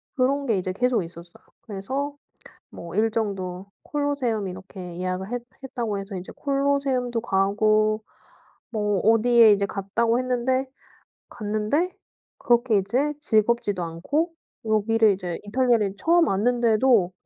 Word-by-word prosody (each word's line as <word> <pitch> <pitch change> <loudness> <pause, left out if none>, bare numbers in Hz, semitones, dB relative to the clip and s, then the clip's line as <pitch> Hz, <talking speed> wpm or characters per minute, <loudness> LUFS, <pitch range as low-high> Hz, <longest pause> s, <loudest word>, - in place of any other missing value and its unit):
그런 275 +1 +1
게 220 -5 +2
이제 185 0 -2
계속 245 0 +1
있었어요. 170 +1 -13 0.2
그래서 260 +7 -4 0.5
뭐 170 0 -9
일정도 200 -4 -1 0.2
콜로세움 280 -8 -1
이렇게 185 -1 -8
예약을 185 +3 -3
했 245 -1 -2 0.2
했다고 230 -5 -3
해서 195 0 -6
이제 180 0 -7
콜로세움도 275 -4 0
가고 215 +1 +2 0.7
뭐 210 -3 0
어디에 225 0 +6
이제 200 0 +2
갔다고 215 +4 0
했는데 255 +1 0 0.6
갔는데 215 - -1 0.4
그렇게 240 -2 +3
이제 255 +10 0
즐겁지도 215 - +1
않고 285 - -2 0.3
여기를 220 0 +3
이제 180 -3 -5
이탈리아를 225 -2 +1
처음 340 0 +4
왔는데도 230 -1 +3
220 Hz, 295 characters per minute, -24 LUFS, 195-250 Hz, 0.7 s, 어디에